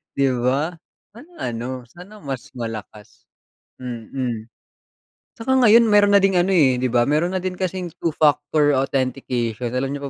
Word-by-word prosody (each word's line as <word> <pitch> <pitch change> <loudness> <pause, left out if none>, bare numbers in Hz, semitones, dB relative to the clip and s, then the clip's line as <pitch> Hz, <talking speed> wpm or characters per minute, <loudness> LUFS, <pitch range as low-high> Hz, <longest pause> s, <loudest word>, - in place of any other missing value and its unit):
Di 140 -1 +2
ba, 135 +8 0 0.4
sana 310 +9 -14 0.2
ano 125 +2 -5
sana 180 - -14
mas 135 -3 -5
malakas, 110 -3 -8 0.6
mm. 120 -1 -5 0.9
Tsaka 250 +3 -1
ngayon 230 +1 +7
meron 205 -1 +4
na - - +8
ding 195 -1 +3
ano, 180 - +1
eh, 145 -9 +4
di 130 - 0
ba, 120 0 +2
meron 160 +7 0
na 185 - -3
din 185 - -1
kasing 185 -2 -3
two-factor 150 -1 +2
authentication, 130 -3 -1
alam 135 +2 -2
niyo 140 -1 -5
140 Hz, 150 wpm, -21 LUFS, 125-180 Hz, 0.9 s, na